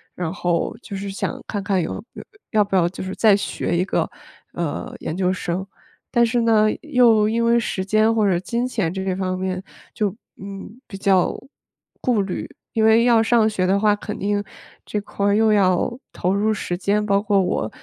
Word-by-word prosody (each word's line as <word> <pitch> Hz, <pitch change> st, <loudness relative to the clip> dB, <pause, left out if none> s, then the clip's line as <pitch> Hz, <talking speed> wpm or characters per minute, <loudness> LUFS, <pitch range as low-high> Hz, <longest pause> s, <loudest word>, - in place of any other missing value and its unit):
然 175 Hz, -2 st, -3 dB
后 175 Hz, 0 st, -1 dB
就 200 Hz, -, -8 dB
是 200 Hz, +1 st, -5 dB
想 195 Hz, -, -4 dB
看 205 Hz, -, -3 dB
看 195 Hz, -2 st, +1 dB
有 165 Hz, -, -4 dB, 0.5 s
要 215 Hz, -2 st, +4 dB
不 200 Hz, -1 st, -3 dB
要 170 Hz, -2 st, +3 dB
就 185 Hz, -, -7 dB
是 190 Hz, 0 st, -5 dB
再 215 Hz, -3 st, +5 dB
学 175 Hz, -3 st, -2 dB
一 180 Hz, -, +2 dB
个， -, -, -1 dB, 0.4 s
呃， 170 Hz, -4 st, -4 dB
研 155 Hz, -, -4 dB
究 185 Hz, 0 st, +1 dB
生。 185 Hz, 0 st, -3 dB, 0.4 s
但 240 Hz, -1 st, +3 dB
是 240 Hz, +1 st, +1 dB
呢， 220 Hz, -2 st, +4 dB
又 245 Hz, -8 st, +4 dB
因 230 Hz, +1 st, 0 dB
为 235 Hz, 0 st, +4 dB
时 195 Hz, -4 st, -2 dB
间 215 Hz, +3 st, +3 dB
或 215 Hz, -2 st, +2 dB
者 175 Hz, -2 st, +2 dB
金 235 Hz, +7 st, -2 dB
钱 210 Hz, -9 st, -1 dB
这 190 Hz, 0 st, -3 dB
些 190 Hz, -1 st, -1 dB
方 185 Hz, -1 st, -2 dB
面 185 Hz, 0 st, -2 dB, 0.3 s
就， 205 Hz, -2 st, -1 dB, 0.3 s
嗯， 200 Hz, +4 st, -9 dB
比 195 Hz, -, -8 dB
较 190 Hz, -2 st, +3 dB
顾 265 Hz, -, -11 dB, 1.0 s
虑， -, -, -21 dB, 0.2 s
因 220 Hz, -1 st, +2 dB
为 220 Hz, +1 st, +5 dB
要 235 Hz, -2 st, +5 dB
上 225 Hz, -1 st, +3 dB
学 195 Hz, -4 st, -1 dB
的 195 Hz, +2 st, +3 dB
话， 210 Hz, +1 st, +3 dB
肯 210 Hz, 0 st, -5 dB
定 205 Hz, +1 st, 0 dB, 0.4 s
这 210 Hz, -, -3 dB
块 200 Hz, 0 st, -4 dB
儿 200 Hz, 0 st, +3 dB
又 220 Hz, 0 st, +4 dB
要 200 Hz, +4 st, +2 dB
投 180 Hz, +2 st, 0 dB
入 210 Hz, +2 st, +1 dB
时 175 Hz, -4 st, -3 dB
间， 205 Hz, +3 st, 0 dB
包 200 Hz, -1 st, +2 dB
括 205 Hz, -2 st, +2 dB
我 180 Hz, -11 st, -1 dB
200 Hz, 215 characters per minute, -22 LUFS, 185-220 Hz, 1.0 s, 再